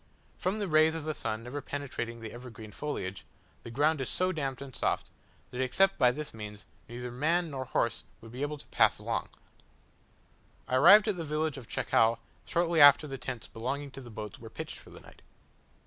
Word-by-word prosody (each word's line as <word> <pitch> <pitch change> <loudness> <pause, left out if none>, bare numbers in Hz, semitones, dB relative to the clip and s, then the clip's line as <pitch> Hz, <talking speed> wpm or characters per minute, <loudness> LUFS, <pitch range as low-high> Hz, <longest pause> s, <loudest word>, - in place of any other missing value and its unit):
From 190 +3 0
the 205 -2 -1
rays 155 0 +4
of 165 - -4
the 155 0 -2
sun 110 -5 -3
never 135 +4 -5
penetrating 125 -5 -5
the 110 - -6
evergreen 115 -3 -10
foliage, 100 -9 -4 0.4
the - - -9
ground 145 +5 +2
is 130 - -3
so 185 0 +1
damp 140 -6 -3
and 135 -2 -9
soft, - - -1 0.4
that 125 - -3
except 190 +10 +3
by 125 - +6
this 150 +4 -5
means 105 -2 -8 0.2
neither 120 +1 -6
man 160 +6 +1
nor 130 -1 -4
horse 115 -1 -1 0.2
would 115 -1 -13
be 125 +3 -7
able 145 +1 -2
to - - -14
pass - - +4
along. - - -3 1.4
I 130 - +2
arrived 205 - +8
at 205 -4 +1
the 165 - -3
village 150 -1 -1
of 120 - -13
Chacao 115 +1 +2 0.3
shortly 170 -2 +2
after 145 +1 +9
the 135 -2 -6
tents 125 -3 -5
belonging 135 +5 -4
to 135 - -9
the 120 - -11
boats 105 -2 -7
were - - -10
pitched - - -7
for - - -15
the - - -13
night. - - -17
135 Hz, 200 wpm, -30 LUFS, 120-155 Hz, 1.4 s, after